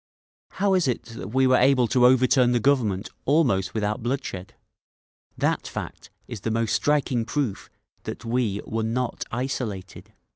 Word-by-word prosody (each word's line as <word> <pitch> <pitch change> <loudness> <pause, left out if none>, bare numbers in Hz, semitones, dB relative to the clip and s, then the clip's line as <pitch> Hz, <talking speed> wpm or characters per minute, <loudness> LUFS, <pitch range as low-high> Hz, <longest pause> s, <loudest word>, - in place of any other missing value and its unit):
How 195 0 +1
is 185 -5 +2
it 125 - -1
that 115 -4 -8
we 130 +5 +2
were 130 0 +5
able 130 -1 +4
to 125 -2 +5
overturn 130 -1 +4
the 120 - +2
Government 115 -6 +1 0.2
almost 125 - +2
without 105 +2 -1
bloodshed?…. 120 -7 -4 0.8
That - - 0
fact - - -7 0.2
is 115 -5 -7
the 115 - -2
most 115 0 0
striking 140 -5 +1
proof 115 -2 -3 0.4
that - - -6
we 115 -4 0
_were 110 0 -3
not 120 +2 -2
isolated. 115 -6 -4
120 Hz, 150 wpm, -24 LUFS, 110-130 Hz, 0.8 s, were